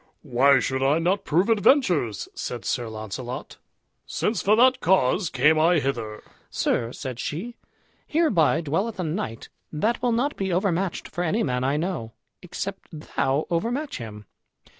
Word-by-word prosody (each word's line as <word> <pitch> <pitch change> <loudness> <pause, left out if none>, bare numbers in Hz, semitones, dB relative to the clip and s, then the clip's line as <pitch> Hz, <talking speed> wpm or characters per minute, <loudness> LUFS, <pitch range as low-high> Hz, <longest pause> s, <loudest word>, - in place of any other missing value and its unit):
"Why 135 0 +4
should 130 0 -1
I 140 +3 +3
not 180 +4 0
prove 175 +6 +2
adventures?" 200 - +2
said - - -5
Sir 120 -2 -1
Launcelot, 110 - -6 0.5
"since 220 - -1
for 210 +2 +4
that 255 +2 +5
cause 180 - +2
came 150 +5 +3
I 170 +2 +4
hither." 115 -7 -3 0.3
"Sir," 115 0 0
said 130 -3 -6
she, 205 - -4 0.5
"hereby 225 - +3
dwelleth 190 +8 -2
a - - 0
knight 155 - -4 0.2
that 215 +10 0
will 245 - +1
not 250 +6 0
be 190 -1 -2
overmatched 185 0 0
for 175 +2 -3
any 205 +7 +1
man 125 -1 -1
I 140 +3 +1
know, 155 -10 -3 0.3
except 190 +2 -6
thou 150 -2 -1
overmatch 245 - -1
him. 105 -3 -8
165 Hz, 150 wpm, -25 LUFS, 130-200 Hz, 0.5 s, that